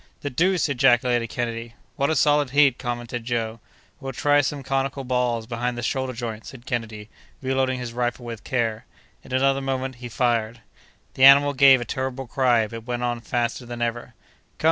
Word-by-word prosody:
"The 145 - -4
deuce!" 180 +5 +2
ejaculated 120 -3 +2
Kennedy. 115 0 -4 0.2
"What 140 - 0
a 160 - +1
solid 145 -1 +3
head!" 140 -2 +4
commented 120 -1 -4
Joe. 115 -1 -2 0.4
"We'll 135 -2 -6
try 145 +3 +3
some 140 0 -3
conical 135 +1 -2
balls 125 -3 0
behind 120 +1 -3
the 120 - -4
shoulder 130 +2 -2
joint," 115 -2 -5
said 130 -2 -12
Kennedy, 110 -4 -4 0.3
reloading 130 -1 0
his 125 -2 -6
rifle 120 0 -2
with 115 -2 -7
care. 115 -3 -2 0.4
In - - -14
another 135 +1 +2
moment 130 -1 -3
he 120 0 -8
fired. 115 -1 0 0.5
The 130 - 0
animal 140 +1 +7
gave 135 -1 +6
a - - -4
terrible 130 +2 -4
cry, 120 -2 +2
but 115 +2 -9
went 120 0 -2
on 120 -1 -2
faster 120 -2 -2
than 120 0 -4
ever. 120 +1 -4 0.4
"Come!" - - -40
125 Hz, 180 wpm, -24 LUFS, 120-135 Hz, 0.5 s, animal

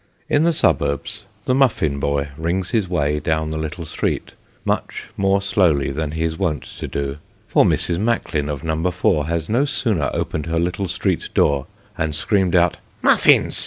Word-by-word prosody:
In 145 +2 +3
the 170 - +4
suburbs, 70 - 0 0.2
the 130 - +2
muffin 115 - +2
boy 70 +1 -1
rings 85 +4 -2
his 105 -6 0
way 75 -4 0
down 80 0 -1
the 80 - -3
little 80 +2 -5
street, - - -2 0.3
much - - -2
more 95 0 +2
slowly 80 -9 +2
than 75 +1 -3
he 80 0 -1
is 80 0 -2
wont 80 -8 -1 0.2
to - - -4
do; 70 0 -3 0.3
for - - +4
Mrs. 85 0 +1
Macklin, 100 -9 0
of 70 -2 -4
No. 80 +2 0
4, 80 -4 +1
has 85 -1 -2
no 120 +6 +2
sooner 110 - 0
opened 75 0 -3
her 80 0 -1
little 90 +3 -1
street - - -1
door, 70 -1 +2 0.3
and 80 -1 -1
screamed 95 +2 +1
out 85 -1 +3
" - - -34
Muffins - - +4
80 Hz, 180 wpm, -21 LUFS, 75-95 Hz, 0.3 s, the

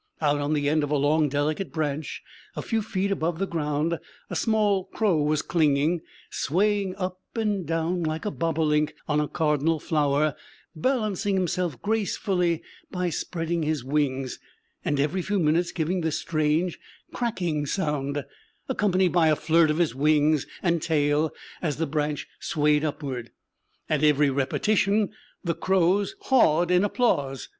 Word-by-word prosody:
Out 145 -2 +2
on 145 +1 0
the 145 -1 0
end 155 +1 +2
of 145 - -2
a 150 - +1
long 150 +2 +2
delicate 150 +6 -1
branch, 155 -2 -3 0.3
a - - -4
few 225 -1 0
feet 200 -1 -1
above 170 -3 -1
the 195 - 0
ground, 160 -1 -1 0.3
a - - -3
small 210 -4 +2
crow 205 -7 +1
was 150 0 +1
clinging, 155 +1 +2 0.3
swaying 195 +3 0
up 185 -1 -4 0.2
and 205 -6 -1
down 165 +2 0
like 160 +2 -2
a 210 - -1
bobolink 155 -3 0
on 150 -1 +2
a 150 - 0
cardinal 155 +1 +1
flower, 150 -1 +1 0.4
balancing 205 - 0
himself 180 -5 -1
gracefully 195 -5 0 0.3
by 180 -1 -2
spreading 165 +1 -2
his 155 -4 -1
wings, 135 -2 -1 0.4
and 145 -1 0
every 155 +6 +1
few 200 +4 -1
minutes 170 +1 +2
giving 175 +2 -1
the 160 -1 0
strange 155 +2 0 0.3
cracking 175 -11 -1
sound, 145 -5 -1 0.4
accompanied 190 -3 +2
by 170 -2 +4
a 155 - +4
flirt 160 +1 +3
of 155 - +1
his 170 -7 +1
wings 150 +1 +2 0.2
and 170 -3 +2
tail 150 0 +1 0.3
as 155 -5 -1
the 165 - 0
branch 150 0 -2
swayed 150 0 +1
upward. 140 -5 -4 0.6
At 155 -1 0
every 150 -1 +4
repetition 200 +9 +1 0.3
the 170 -2 0
crows 190 - +1
hawed 175 - +3
in 180 +1 +4
applause. 145 - 0
160 Hz, 150 wpm, -26 LUFS, 150-185 Hz, 0.6 s, by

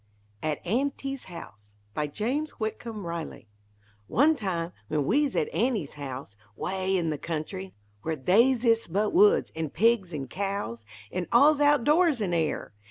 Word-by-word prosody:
AT 155 -1 -1
AUNTY'S 275 +5 -2
HOUSE 105 - -11 0.2
BY 150 +4 -1
JAMES 260 - -2
WHITCOMB 220 -2 -4
RILEY 170 -8 -6 0.6
One 295 - +4
time, 180 - -2 0.2
when 150 +2 0
we'z 290 - +2
at 460 0 0
Aunty's 225 - 0
house 135 -6 -7 0.2
'Way 190 - -1
in 165 -3 0
the 150 - -3
country! 180 +4 -5 0.3
where 160 0 -2
They's 230 - +3
ist 230 -6 +2
but 210 - +1
woods 415 +6 +5
an' 160 -1 -2
pigs, 205 +1 +2
an' 140 -4 -4
cows 195 - -3 0.3
An' 180 -1 -3
all's 285 +5 +6
out 290 -3 +4
doors 305 -1 +4
an' 190 -5 -1
air! 160 -8 -1
195 Hz, 155 wpm, -27 LUFS, 160-260 Hz, 0.6 s, all's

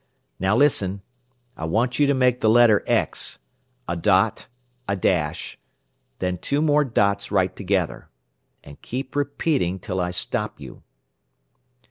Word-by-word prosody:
"Now 95 +3 +2
listen. 100 -8 +2 0.5
I 80 - -5
want 120 - 0
you 145 - +4
to 140 - +2
make 125 -1 +2
the 110 - +3
letter 115 -2 +5
X - - 0 0.5
a 85 - -2
dot, 85 - +2 0.4
a 100 - 0
dash, 85 -5 -1 0.6
then 90 -1 -2
two 140 - -1
more 150 -1 +3
dots 100 -6 0
right 95 -2 +1
together. 95 -4 -2 0.5
And 70 0 -14
keep 130 +2 -6
repeating 140 - 0
till 95 0 -4
I 90 - -1
stop 90 - -3
you." - - -11
100 Hz, 135 wpm, -23 LUFS, 90-130 Hz, 0.6 s, letter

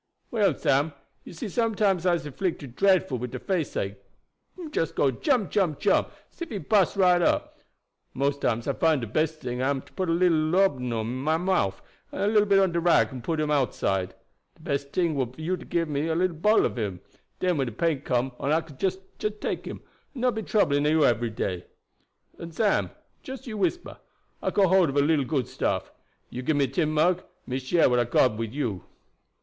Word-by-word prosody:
"Well, 215 -4 +2
Sam, 145 +3 +1 0.3
you - - -11
see 170 - -5
sometimes 205 -4 +1
I'se 175 -4 +1
'flicted 145 -5 -4
dre'fful 185 -10 +2
wid 125 +1 -4
de - - -5
faceache 145 - -2 0.6
him 335 -4 -8
just 165 - -1
go 135 - +3
jump, 240 - 0
jump, 180 -8 +1
jump, - - +2 0.2
as - - -27
ef 340 - -4
he 215 - -4
bust 200 -1 +2
right 180 -2 +4
up. - - 0 0.6
Mose 140 +1 0
times 120 -3 -1
I 140 - +1
find 155 -1 +2
de - - -3
best 155 +7 -1
ting 125 0 -3
am 135 0 0
to - - -21
put 185 -2 -2
a - - +3
little 170 -1 +3
laudabun 155 -6 +1
in 115 +3 -4
my 155 +5 +1
mouf, 175 - 0 0.3
and - - -3
a - - +2
little 205 -2 +4
on 190 - +1
bit - - -7
of 170 - -1
rag 175 -4 +4
and 130 -3 -8
put 160 +3 -1
him 150 -1 0
outside. 95 -9 0 0.4
De - - -22
best 140 0 -3
ting 170 -3 +1
would 130 -4 -2
be - - -20
for 160 - -10
you 175 +4 0
to 180 - -11
gib 170 -1 -1
me 150 +2 -1
little 175 +1 +1
bottle 210 +8 +3
of - - -3
him; 100 -5 -3 0.4
den 180 -3 +1
when 135 -2 0
de - - -4
pain 150 +4 0
come 125 -1 0
on 140 - -1
I 160 +2 +3
could 155 -5 -15
jess 190 -1 0 0.2
take 210 0 -3
him, - - -7 0.3
and 250 - -6
not 250 -1 +2
be 220 - -3
troubling 145 -10 +2
you 155 +1 +3
ebery 120 -1 +2
day. 95 -4 -3 0.7
And 165 -1 -8
Sam, 210 -3 +2 0.3
jus 265 0 -8
you 230 -4 -6
whisper 215 - -2 0.4
I - - 0
got 195 -3 +3
hold 185 -3 +4
of 135 - -3
a - - +5
little 145 -1 +2
good 130 -2 -1
stuff. - - -2 0.4
You 125 - -5
gib 150 +4 0
me 140 -1 +3
tin 150 +5 0
mug; 175 +4 +2 0.2
me 130 +1 -3
share 135 +6 +3
what 125 -1 +2
I 120 - +2
hab 120 - -14
got 115 -4 +3
wid 115 +2 -4
you." 110 - -2
155 Hz, 220 wpm, -26 LUFS, 130-185 Hz, 0.7 s, a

